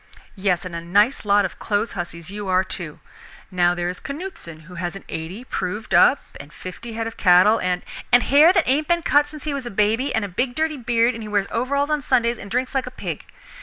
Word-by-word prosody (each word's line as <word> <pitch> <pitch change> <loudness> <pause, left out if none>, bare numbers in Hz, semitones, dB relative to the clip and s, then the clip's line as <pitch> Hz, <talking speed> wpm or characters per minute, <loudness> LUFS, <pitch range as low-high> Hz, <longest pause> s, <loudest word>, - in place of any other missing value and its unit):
"Yes, 190 -3 0
and 180 - -7
a 170 - -4
nice 205 +9 +2
lot 205 0 +4
of 185 - -3
store - - -14
clothes 210 +1 0
huzzies 170 -1 -6
you 205 0 -6
are 185 0 +3
too. 170 -5 -5 0.5
Now 175 -1 +2
there 175 0 -2
is 180 +1 -4
Canuteson 280 - -7
who 180 +2 -14
has 175 +1 -4
an 195 - -9
'eighty' 170 +8 -6
proved 210 -3 -4
up 280 - +5 0.2
and 145 - -11
fifty 185 +7 -9
head 225 0 -3
of 225 - -6
cattle 185 +4 +5
and 180 -1 -1
" - - -13
"And 245 0 +6
hair 300 +5 +6
that 360 -4 +2
ain't 295 +4 +1
been 345 -1 +1
cut 290 -1 +3
since 300 0 -10
he 300 - -2
was 270 -3 -4
a - - -3
baby, 215 +6 +1
and 220 -2 0
a - - -4
big 245 +7 -2
dirty 315 0 -1
beard, 240 -1 +2
and 225 - -7
he 215 - -7
wears 205 -2 +1
overalls 280 +5 0
on 300 -1 +1
Sundays, 235 -3 +1
and 200 - -9
drinks 250 +4 -1
like 265 -1 -1
a - - -3
pig. - - -6
220 Hz, 245 wpm, -22 LUFS, 185-265 Hz, 0.5 s, And